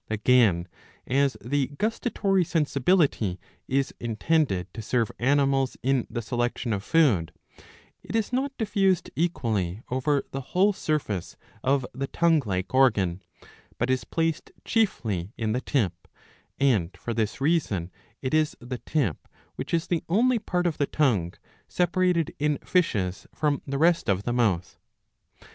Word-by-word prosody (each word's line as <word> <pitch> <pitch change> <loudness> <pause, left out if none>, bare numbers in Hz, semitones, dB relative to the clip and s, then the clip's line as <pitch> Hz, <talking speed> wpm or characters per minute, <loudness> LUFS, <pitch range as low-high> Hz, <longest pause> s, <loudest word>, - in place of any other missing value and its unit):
Again, 110 -5 +3 0.4
as 135 +1 +1
the 140 +1 +1
gustatory 210 - +1
sensibility 145 - +1 0.3
is 135 +1 0
intended 115 - 0
to 115 - -6
serve 115 0 0
animals 135 0 +2
in 135 -1 +1
the 120 0 -4
selection 120 0 -1
of 100 -1 -3
food, 125 - +3 0.7
it - - -6
is 225 +2 0
not 265 +2 0
diffused 200 -5 +1
equally 110 - -1
over 140 +2 +1
the 135 - -4
whole 190 +9 +2
surface 150 - -2 0.3
of 135 -1 +2
the 135 +2 -3
tongue 165 -1 +3
like 95 +2 -2
organ, 100 -9 +3 0.6
but 125 +2 0
is 130 - 0
placed 165 -1 -2
chiefly 115 - 0
in 110 -2 -1
the 125 +3 -1
tip; 115 - 0
^' - - -46 0.5
and 110 -11 +2
for 120 - -4
this 110 0 -1
reason 135 - 0 0.3
it 130 - -2
is 155 -1 +2
the 120 +1 -6
tip 130 - -2 0.3
which - - -6
is 165 -1 +1
the 170 -2 -1
only 235 +6 +3
part 180 -3 -1
of 170 -3 -1
the 145 - +2
tongue 105 - +1 0.3
separated 180 -2 +1
in 150 0 +1
fishes 100 - 0
from 150 -2 0
the 140 0 -2
rest 165 -4 +3
of 100 0 +1
the 120 - -1
mouth. 100 -8 0
135 Hz, 145 wpm, -26 LUFS, 110-165 Hz, 0.7 s, Again